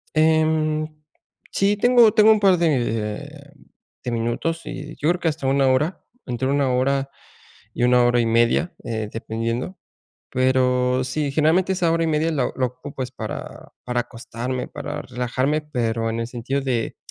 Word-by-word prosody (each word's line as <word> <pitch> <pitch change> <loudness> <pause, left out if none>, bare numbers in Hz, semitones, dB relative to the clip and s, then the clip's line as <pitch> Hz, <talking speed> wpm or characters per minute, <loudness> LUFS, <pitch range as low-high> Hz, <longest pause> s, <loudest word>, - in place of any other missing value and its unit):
Em, 155 -1 +2 0.6
sí, 200 +1 +2
tengo 240 0 +5
tengo 220 0 +6
un 215 - +4
par 195 -3 +4
de, 140 -1 -2
mm, 140 - -21 0.4
de 125 - -3
minutos 120 +8 -1
y 150 +2 -7
yo 150 - 0
creo 175 - +1
que 175 - -1
hasta 150 -4 -1
1 135 0 +3
hora, 150 +8 0 0.2
entre 125 +1 -2
1 140 -1 +2
hora 135 +2 +1 0.6
y - - -5
1 125 0 +5
hora 120 0 +3
y - - +1
media, 115 +9 +2
eh, 110 -2 -3
dependiendo, 115 +8 -3 0.5
pero 130 0 +2
sí, 140 +2 -2
generalmente 160 +6 +2
esa 180 -2 +1
hora 165 0 +1
y - - 0
media 155 +1 +1
la 135 -5 0
la 130 - +2
ocupo 130 +2 -7
es 125 - -7
para 110 -4 -7
para 125 -1 0
acostarme, 120 +1 -5
para 145 0 -6
relajarme. 130 +4 -1
Pero, 115 -6 -2
en 115 - -2
el 115 - -3
sentido 125 +3 -3
de 125 -4 -2
135 Hz, 170 wpm, -22 LUFS, 120-155 Hz, 0.6 s, tengo